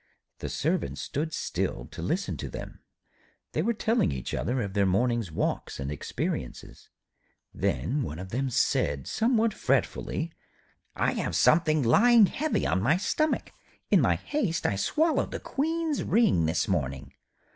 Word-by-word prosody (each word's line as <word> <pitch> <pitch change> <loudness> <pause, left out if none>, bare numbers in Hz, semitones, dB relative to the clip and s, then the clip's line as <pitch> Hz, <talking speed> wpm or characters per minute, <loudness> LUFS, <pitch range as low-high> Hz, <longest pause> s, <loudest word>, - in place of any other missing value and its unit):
The - - -4
Servant 170 +6 -1
stood 155 +3 -3
still - - -3
to - - -7
listen - - -1
to - - -5
them. - - -8 0.7
They 155 - 0
were 230 +6 0
telling 225 - +1
each 65 -2 -5
other 125 +3 -1
of 100 -1 -5
their 100 -1 +2
morning's 115 0 +1
walks 80 - -2
and 70 +1 -3
experiences. 65 -3 -5 0.6
Then 140 +5 -1
one 80 - -4
of 95 +1 -7
them 130 +5 -1
said 70 - +1
somewhat 225 -1 +1
fretfully: 165 -5 -1 0.6
'I - - +1
have - - -2
something 155 -2 +4
lying 225 - +6
heavy 305 +10 -1
on 95 - +1
my 140 - +3
stomach. 310 +10 0 0.4
In - - +6
my - - +3
haste 210 - -2
I 100 - +2
swallowed 310 - +1
the - - -5
Queen's 320 +1 -1
ring 195 - +3
this 80 0 0
morning.' 70 -6 -2
145 Hz, 150 wpm, -28 LUFS, -, 0.7 s, lying